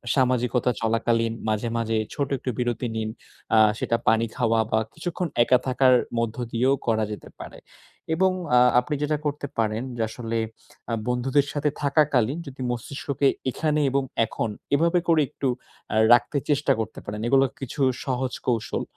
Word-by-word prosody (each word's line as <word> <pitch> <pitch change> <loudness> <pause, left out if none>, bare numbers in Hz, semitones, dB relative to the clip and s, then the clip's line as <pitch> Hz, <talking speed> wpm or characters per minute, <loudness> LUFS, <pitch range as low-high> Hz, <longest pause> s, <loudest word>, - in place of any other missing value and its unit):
সামাজিকতা 125 -1 +2
চলাকালীন 115 0 +1 0.2
মাঝে, 110 +2 0
মাঝে 115 -1 0 0.2
ছোট 140 -2 -1
একটু 125 - -5
বিরতি 120 0 -1
নিন। 110 -1 -2 0.5
আ - - +7 0.2
সেটা 115 - +1
পানি 115 +1 +4
খাওয়া 115 -2 +2
বা 110 - +3
কিছুক্ষণ 175 +2 -3 0.2
একা 125 - +4
থাকার 130 0 +4 0.2
মধ্য 115 -1 -1 0.2
দিয়েও 125 +4 +2
করা 110 -1 +2
যেতে 105 - -8
পারে। - - -10 0.6
এবং 190 +2 +3 0.3
আ - - +8 0.2
আপনি 125 +4 -3
যেটা 150 0 +1
করতে 145 -1 -2
পারেন 110 +1 0
যে, 115 - -3
আসলে 115 0 -4 0.5
আ, - - 0
বন্ধুদের 130 +3 +1
সাথে 150 0 +1
থাকাকালীন 140 -2 +2
যদি 130 -1 -9
মস্তিষ্ককে 140 +3 -2 0.2
এখানে 150 +2 0
এবং 140 +1 +1 0.2
এখন 110 0 -3 0.3
এভাবে 170 +4 +3
করে 165 -2 +4
একটু 140 -2 -3 0.5
আ - - 0 0.2
রাখতে 125 +4 +3
চেষ্টা 145 +1 +2
করতে 110 - -4
পারেন। 105 +1 -5
এগুলো 135 +2 +5
কিছু 135 +2 -5 0.2
সহজ 130 -1 -1
কৌশল। 115 -3 -1
125 Hz, 160 wpm, -25 LUFS, 115-140 Hz, 0.6 s, আ